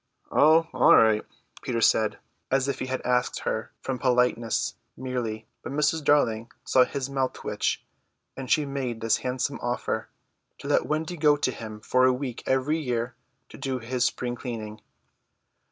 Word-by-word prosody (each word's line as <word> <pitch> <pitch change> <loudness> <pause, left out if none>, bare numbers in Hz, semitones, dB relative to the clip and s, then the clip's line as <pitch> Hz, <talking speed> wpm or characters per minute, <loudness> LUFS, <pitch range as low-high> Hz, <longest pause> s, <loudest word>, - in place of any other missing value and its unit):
"Oh, 160 +2 +5
all - - +6
right," 110 -1 +5 0.4
Peter 115 -2 -2
said, 110 -2 +3 0.3
as 135 0 +2
if 140 -2 -2
he 130 - -3
had 130 0 -2
asked 125 0 +1
her - - -3
from 130 -2 -3
politeness 125 -3 +1 0.2
merely; 120 -4 -3 0.2
but - - -7
Mrs. 150 +2 +1
Darling 115 -6 +2
saw 130 -1 +5
his 135 -1 -4
mouth 135 -2 -1
twitch, - - -2 0.5
and 135 -2 -7
she 155 -2 +3
made 135 -4 -3
this 115 -1 +2
handsome 130 +2 -2
offer: 120 0 -2 0.5
to - - -9
let - - +2
Wendy 160 +3 -2
go 150 -1 +4
to 135 - 0
him 110 -3 -8
for 130 +3 +3
a 130 - +5
week 125 -2 -4
every 135 +5 +1
year 125 -4 -2 0.4
to - - -12
do 130 -1 -2
his 125 +1 -2
spring 125 0 -1
cleaning. 110 -4 -6
125 Hz, 165 wpm, -26 LUFS, 115-140 Hz, 0.5 s, all